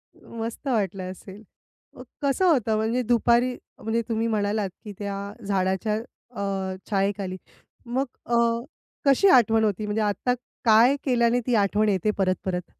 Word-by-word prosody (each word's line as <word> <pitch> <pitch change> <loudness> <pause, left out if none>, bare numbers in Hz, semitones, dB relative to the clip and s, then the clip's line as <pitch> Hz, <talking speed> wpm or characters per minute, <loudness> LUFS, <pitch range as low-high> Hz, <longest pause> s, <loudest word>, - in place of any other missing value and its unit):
मस्त 230 +4 -7
वाटलं 195 -6 -1
असेल. 195 +3 -12 0.5
मग - - -10 0.2
कसं 280 +6 +1
होतं 245 - +3
म्हणजे 225 +3 0
दुपारी 240 +2 +3 0.3
म्हणजे 225 +1 0
तुम्ही 225 0 0
म्हणालात, 210 -2 0
की 210 -2 -8
त्या 200 -1 -3 0.3
झाडाच्या 190 +2 0 0.4
अ, 195 -1 -2
छायेखाली 195 -2 -1 0.5
मग 255 +3 -1 0.2
अ, 240 - 0 0.7
कशी 275 +8 +5
आठवण 225 - +5
होती 210 0 0
म्हणजे 210 +1 -1
आत्ता 210 +4 0 0.3
काय 230 +5 +6
केल्याने 240 -2 +2
ती 245 - +2
आठवण 210 +1 +2
येते 200 +1 +1
परत 185 -1 +2
परत? 180 -1 -3
215 Hz, 140 wpm, -25 LUFS, 195-235 Hz, 0.7 s, काय